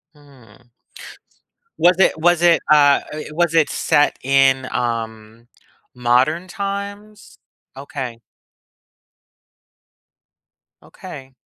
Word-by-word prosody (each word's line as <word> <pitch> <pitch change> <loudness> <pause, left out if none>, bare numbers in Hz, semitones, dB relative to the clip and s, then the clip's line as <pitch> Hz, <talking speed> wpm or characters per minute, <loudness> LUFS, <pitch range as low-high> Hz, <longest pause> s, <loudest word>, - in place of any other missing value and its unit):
Mm. 125 -5 -21 1.1
Was 180 +1 +3
it 160 - +2
was 175 0 +2
it, 170 -1 +4
uh 145 -2 +5
eh, 155 0 -7
was 170 +1 0
it 160 -2 +3
set 145 - +1
in, 135 -1 +2
um, 115 -1 -5 0.5
modern 130 +9 +1
times? 200 +1 -7 0.4
Okay. 135 -5 -7 2.6
Okay. 130 0 -12
145 Hz, 85 wpm, -19 LUFS, 125-175 Hz, 2.6 s, uh